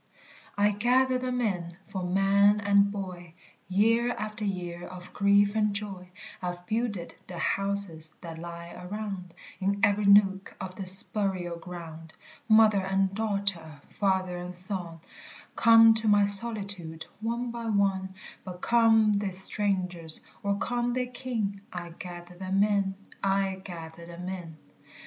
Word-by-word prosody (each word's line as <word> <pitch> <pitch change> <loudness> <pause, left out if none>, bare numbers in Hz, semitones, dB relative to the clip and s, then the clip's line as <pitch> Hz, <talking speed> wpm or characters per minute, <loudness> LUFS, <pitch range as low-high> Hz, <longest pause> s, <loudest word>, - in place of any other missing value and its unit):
"I 205 +1 +3
gather 255 +5 +2
them 250 -1 -2
in! 175 -6 -3
for 190 -2 -4
man 195 +3 +3
and 200 0 +3
boy, 180 -4 -7 0.3
Year 230 +5 +2
after 215 0 -6
year 175 -3 -4
of 180 0 -11
grief 200 0 +3
and 210 -2 +1
joy, 195 -3 -6 0.3
I 180 -1 -2
've 175 0 -15
builded 215 -5 -3
the 180 - -8
houses 195 -5 -1
that 165 -2 -8
lie 170 0 -8
around, 185 -1 -7 0.2
In 200 +1 -1
every 205 -1 +3
nook 195 -1 +4
of 185 -1 -7
this 190 +2 +7
burial 185 -6 -3
ground; 165 -2 -10 0.4
Mother 215 -2 +5
and 195 0 0
daughter, 195 -8 -2 0.2
father 190 -3 0
and 180 0 -7
son, 175 -3 -4 0.5
Come 225 0 +7
to 220 0 +3
my 205 -1 +5
solitude, 200 -6 +2
one 235 +2 -3
by 235 -1 -6
one: 195 -3 0 0.3
But 180 -1 -8
come 225 -2 +4
they 200 -1 -2
strangers 185 -3 +1 0.2
or 200 0 -1
come 240 +3 -1
they 250 0 -1
kin 230 -6 -4
I 175 -1 -6
gather 175 +1 -10
them 190 +2 0
in, 200 -2 0 0.3
I 195 -1 0
gather 170 -2 -9
them 175 +1 -8
in. 175 -4 -7
195 Hz, 140 wpm, -27 LUFS, 180-210 Hz, 0.5 s, this